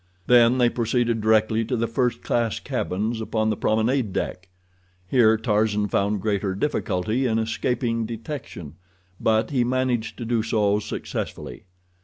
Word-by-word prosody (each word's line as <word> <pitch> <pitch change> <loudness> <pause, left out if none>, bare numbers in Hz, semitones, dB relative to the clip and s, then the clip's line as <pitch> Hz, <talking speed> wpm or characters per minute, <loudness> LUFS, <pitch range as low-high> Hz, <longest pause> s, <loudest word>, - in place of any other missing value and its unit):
Then 120 +2 +5
they 125 -1 +4
proceeded 120 -1 0
directly 110 +1 +3
to 125 +2 -1
the 115 - 0
first 125 +1 -1
class 115 -2 0
cabins 110 +5 -2
upon 110 0 0
the - - -1
promenade 110 +2 +1
deck. 90 +1 -3 0.6
Here 110 0 +4
Tarzan 105 -2 +1
found 100 0 0
greater 100 -3 -1
difficulty 110 -1 -1
in 110 -1 +1
escaping 115 0 -1
detection, 115 - -7 0.4
but 110 +2 +1
he 130 -4 +2
managed 120 -3 -1
to 120 - -5
do 115 -1 +1
so 105 -2 +1
successfully. 105 - -6
110 Hz, 140 wpm, -24 LUFS, 105-120 Hz, 0.6 s, Then